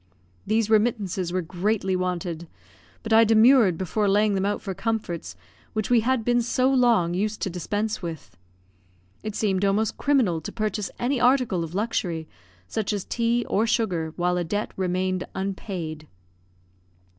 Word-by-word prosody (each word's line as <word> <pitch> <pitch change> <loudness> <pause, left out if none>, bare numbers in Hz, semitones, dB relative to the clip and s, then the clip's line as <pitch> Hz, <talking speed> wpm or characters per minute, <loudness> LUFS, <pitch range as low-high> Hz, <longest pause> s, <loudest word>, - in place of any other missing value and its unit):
These 220 +1 +2
remittances 210 -5 +1
were 185 0 -1
greatly 190 +3 -1
wanted; 175 -2 -3 0.6
but 225 - -1
I 225 +1 +8
demurred 225 -4 +5
before 200 +3 0
laying 205 +1 +3
them 195 0 0
out 205 - -1
for 195 - -5
comforts 180 - -3 0.4
which 215 +1 -2
we 240 - +6
had 235 0 0
been 240 0 +3
so 255 +3 +1
long 235 -10 +3
used 210 +4 -1
to 190 - -1
dispense 205 +5 -2
with. 160 - -7 0.9
It 215 -1 -5
seemed 195 -3 0
almost 200 +2 +1
criminal 240 - +2
to - - -6
purchase 215 -2 -2
any 255 +2 0
article 245 -8 +3
of 165 +2 -7
luxury, 180 -7 -2 0.4
such 215 - -2
as 200 -2 -3
tea 235 0 0
or 220 +3 +1
sugar, 180 -9 0
while 180 0 0
a 175 - 0
debt 205 +5 -2
remained 185 0 -1
unpaid. 185 -5 -4
205 Hz, 155 wpm, -25 LUFS, 180-225 Hz, 0.9 s, I